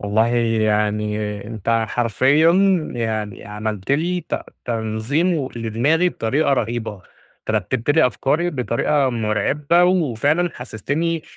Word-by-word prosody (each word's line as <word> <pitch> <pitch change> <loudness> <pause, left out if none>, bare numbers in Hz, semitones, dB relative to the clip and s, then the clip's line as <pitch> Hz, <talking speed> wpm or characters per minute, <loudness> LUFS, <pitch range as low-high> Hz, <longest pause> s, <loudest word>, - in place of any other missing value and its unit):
والله 105 +2 +2 0.4
يعني 105 0 0 0.3
أنت 115 +1 -1
حرفيًا 130 +8 +3 0.4
يعني 110 -3 -3
عملت 105 +2 -3
لي 175 +5 0
ت - - -1 0.3
تنظيم 115 +9 0
و 135 -4 -2
لدماغي 120 +10 +1
بطريقة 140 +2 0
رهيبة، 120 -3 -1 0.5
أنت - - -5
رتبت 115 +5 -1
لي 160 0 +5
أفكاري 150 +7 0
بطريقة 135 +1 0
مرعبة، 130 - +1
وفعلًا 165 -1 +1
حسستني 145 +8 -3
120 Hz, 110 wpm, -20 LUFS, 110-155 Hz, 0.5 s, لي